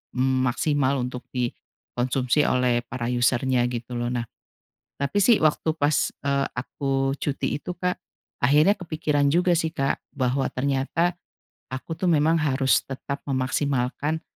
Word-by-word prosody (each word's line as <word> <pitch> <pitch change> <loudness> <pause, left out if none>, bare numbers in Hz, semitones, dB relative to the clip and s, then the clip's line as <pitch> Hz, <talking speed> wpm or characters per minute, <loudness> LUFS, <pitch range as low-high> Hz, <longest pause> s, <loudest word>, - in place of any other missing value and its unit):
mmm, 130 0 +2
maksimal 140 +1 +1
untuk 125 0 -5
dikonsumsi 125 +2 -1
oleh 125 -1 +2
para 120 -2 -4
user-nya 125 +1 +2
gitu 120 0 -5
loh. 120 +1 -2
Nah 120 -1 -2 0.7
tapi 140 +9 -1
sih 215 -2 +4
waktu 155 +1 +2
pas, 145 -1 +2 0.2
eee, 140 0 +1
aku 135 +1 -1
cuti 145 0 -2
itu 180 +4 -6
Kak, 180 0 -2 0.4
akhirnya 150 +10 +4
kepikiran 155 -4 0
juga 180 +1 +3
sih 160 -1 0
Kak 135 0 0 0.2
bahwa 130 0 0
ternyata 140 +6 0 0.6
aku 135 +5 -5
tuh 185 - -1
memang 160 +1 +3
harus 135 -3 +2
tetap 140 +1 -5
memaksimalkan 135 +2 -1
135 Hz, 135 wpm, -25 LUFS, 125-150 Hz, 0.7 s, sih